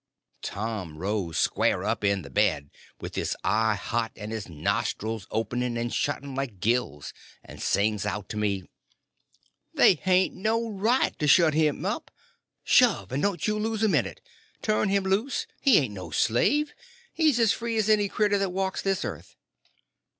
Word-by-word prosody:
Tom 100 -7 -4
rose 95 -2 -2
square - - +1
up - - -1
in 100 -2 +1
bed, 70 +1 0 0.3
with - - -7
his - - -2
eye 110 0 +2
hot, 115 +3 -2
and 105 +1 -7
his 110 -4 -5
nostrils 100 +5 -2
opening 120 +2 -2
and 120 0 -2
shutting 140 -1 -2
like 130 -7 -4
gills, 110 -9 -1 0.3
and - - -12
sings 105 0 +1
out 105 0 -3
to - - -5
me: 100 -3 -1 1.1
"They - - +7
hain't 185 +2 +2
no 225 +4 0
right 220 +6 +1
to 150 - 0
shut 160 +1 +5
him 155 -1 +1
up! - - -3 0.5
Shove!—and 115 +9 +3
don't 180 -7 0
you 215 0 0
lose 220 0 -1
a - - +5
minute. - - 0 0.4
Turn 215 -1 +1
him 200 0 +2
loose! 200 +8 0 0.2
he 270 -7 +6
ain't 130 -8 +1
no 90 -4 -7
slave; 285 - +1 0.4
he's 305 -7 +3
as 225 -3 +4
free 230 -1 -3
as 215 -1 +1
any 210 -2 +3
cretur 205 -1 +1
that 195 -1 0
walks 190 +1 -2
this 195 +1 -1
earth!" - - -7
130 Hz, 160 wpm, -26 LUFS, -, 1.1 s, They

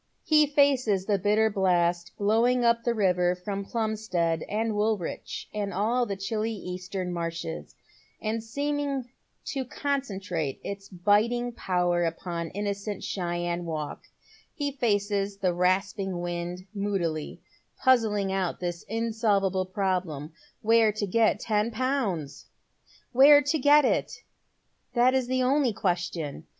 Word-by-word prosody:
He 305 -1 +4
faces 265 -9 +2
the 200 -1 +1
bitter 210 +3 +3
blast 175 -3 +1
blowing 235 +4 +2
up 235 0 +3
the 240 -1 0
river 180 -3 +2
from 195 +2 -4
Plumstead 195 -7 -1
and 220 +2 0
Woolwich 210 -4 -2
and 205 -1 -2
all 230 +6 +1
the 200 - -2
chilly 215 +3 -2
eastern 180 -1 -5
marshes, 165 -1 -5 0.4
and 220 +1 -2
seeming 280 +1 -2 0.3
to 270 -2 -2
concentrate 200 - -3
its 200 0 -6
biting 215 +6 +2
power 180 -5 0
upon 170 0 -3
innocent 200 +1 -4
Cheyne 175 -1 -2
Walk, 155 -3 -5 0.5
he 285 -1 -2
faces 205 -5 0
the 185 -3 +1
rasping 190 +1 0
wind 175 +1 -4
moodily, 190 -7 -2 0.4
puzzling 215 -6 +2
out 190 -2 -1
this 175 -1 -4
ineolvable 205 -4 0
problem, 180 -6 -2 0.3
where 225 0 +5
to 210 0 -2
get 215 +1 +2
ten 210 0 0
pounds! 225 - -2 0.6
Where 290 +3 +8
to 285 +3 0
get 290 +1 +6
it? - - -1 0.7
that 245 +2 +4
is 260 -2 +1
the 255 0 +1
only 265 -2 +2
question. 175 - -2
205 Hz, 125 wpm, -27 LUFS, 180-230 Hz, 0.7 s, Where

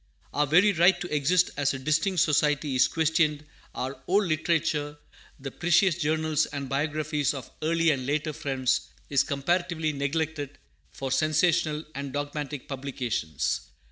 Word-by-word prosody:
Our 150 0 +1
very 185 +8 +5
right 175 +1 +4
to 175 -4 -3
exist 170 +5 +3
as 145 -1 +1
a - - -3
distinct 155 +6 +1
society 150 -1 +2
is 130 - +4
questioned. 155 -2 +1 0.3
Our 130 +1 -4
old 200 +3 +3
literature 155 -3 0 0.4
the 135 0 -6
precious 175 +3 +3
journals 155 -1 0
and 140 -2 -5
biographies 150 +1 -1
of 130 -3 -8
early 165 +1 +2
and 130 -3 -2
later 155 +2 -1
Friends 130 -3 -1 0.2
is 140 - +4
comparatively 160 +2 -1
neglected 145 0 -2 0.3
for 135 -1 -5
sensational 155 +1 +2
and 140 -1 -5
dogmatic 145 -1 -4
publications. 130 - -2
150 Hz, 140 wpm, -27 LUFS, 140-160 Hz, 0.4 s, very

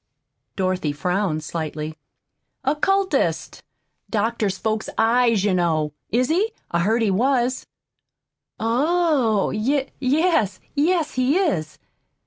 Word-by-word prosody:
Dorothy 185 -5 -1
frowned 180 0 -1
slightly. 155 -1 -4 0.7
"Occultist 380 +8 0 0.5
doctors 215 -2 0
folks' 220 +1 -2
eyes, 230 -2 +3
you 205 -2 +2
know. 160 -4 0 0.2
Is 250 +4 +1
he? 405 +8 +1 0.2
I 170 - +1
heard 220 +6 +2
he 210 - +2
was." 255 +4 +1 0.9
"Oh! 260 - +2
Y 265 +6 0
yes 270 - +1
yes, 315 +1 +1
he 255 +5 +2
is." 170 - -1
230 Hz, 105 wpm, -22 LUFS, 185-285 Hz, 0.9 s, eyes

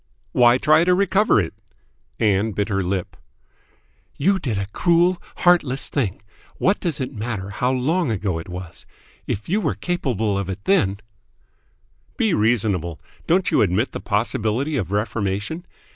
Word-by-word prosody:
"Why 120 0 +5
try 155 +4 +4
to 180 0 +4
recover 200 - +3
it?" 85 -5 -2 0.7
Ann 105 +1 +2
bit 100 +3 -1
her 100 -1 0
lip. 95 0 -3 1.0
"You 190 +6 +2
did 120 - -2
a 100 - -1
cruel, 175 +1 +3
heartless 150 -7 +2
thing. 105 -8 -2 0.3
What 195 +3 +2
does 170 -5 -2
it 130 +1 -3
matter 105 -4 -4
how 125 +5 0
long 145 +6 +1
ago 100 -6 -1
it 80 - -9
was? 90 -1 -8 0.4
If 105 - -3
you 205 +6 +1
were - - 0
capable 120 - -1
of 100 -1 -4
it 95 +1 -5
then 100 - +2 0.6
" - - -40
"Be 220 -6 +2
reasonable. 100 - +1 0.3
Don't 180 +3 +2
you 155 - +4
admit 105 +5 +1
the - - -5
possibility 115 +6 -1
of 100 -8 -2
reformation? 105 - -2
115 Hz, 155 wpm, -22 LUFS, 100-165 Hz, 1.0 s, Why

